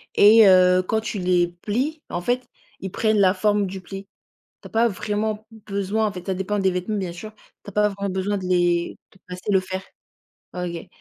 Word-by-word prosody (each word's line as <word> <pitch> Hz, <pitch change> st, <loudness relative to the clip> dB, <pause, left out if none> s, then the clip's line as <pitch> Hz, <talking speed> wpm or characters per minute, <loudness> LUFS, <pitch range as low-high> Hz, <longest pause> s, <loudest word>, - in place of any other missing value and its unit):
et 215 Hz, +1 st, +8 dB
heu, 185 Hz, -1 st, +6 dB
quand 220 Hz, +4 st, -1 dB
tu 215 Hz, -2 st, -4 dB
les 180 Hz, -1 st, +2 dB
plies, 275 Hz, +9 st, -2 dB
en 175 Hz, -, -3 dB
fait, 245 Hz, +7 st, -1 dB, 0.3 s
ils 190 Hz, -, -6 dB
prennent 215 Hz, 0 st, +1 dB
la 185 Hz, -1 st, +4 dB
forme 205 Hz, -1 st, +1 dB
du 190 Hz, +1 st, -6 dB
pli. 195 Hz, +2 st, -9 dB, 0.5 s
Tu -, -, -10 dB
as -, -, -16 dB
pas 230 Hz, +1 st, +3 dB
vraiment 215 Hz, +1 st, -3 dB, 0.2 s
besoin, 200 Hz, +2 st, -1 dB
en 210 Hz, -, 0 dB
fait, 180 Hz, 0 st, -9 dB
ça 190 Hz, -, -1 dB
dépend 200 Hz, +2 st, -2 dB
des 190 Hz, -1 st, +2 dB
vêtements 180 Hz, +4 st, -2 dB
bien 185 Hz, -3 st, -3 dB
sûr, 215 Hz, +5 st, -9 dB, 0.3 s
tu -, -, -9 dB
as -, -, -10 dB
pas 210 Hz, +1 st, +2 dB
vraiment 200 Hz, -1 st, -4 dB
besoin 195 Hz, +2 st, -1 dB
de 190 Hz, -, -6 dB
les 175 Hz, -1 st, +1 dB, 0.2 s
de 190 Hz, -, -23 dB
passer 180 Hz, +3 st, -5 dB
le 190 Hz, -, +5 dB
fer. 185 Hz, 0 st, -5 dB, 0.7 s
OK. 175 Hz, -2 st, -5 dB
195 Hz, 215 wpm, -23 LUFS, 185-210 Hz, 0.7 s, et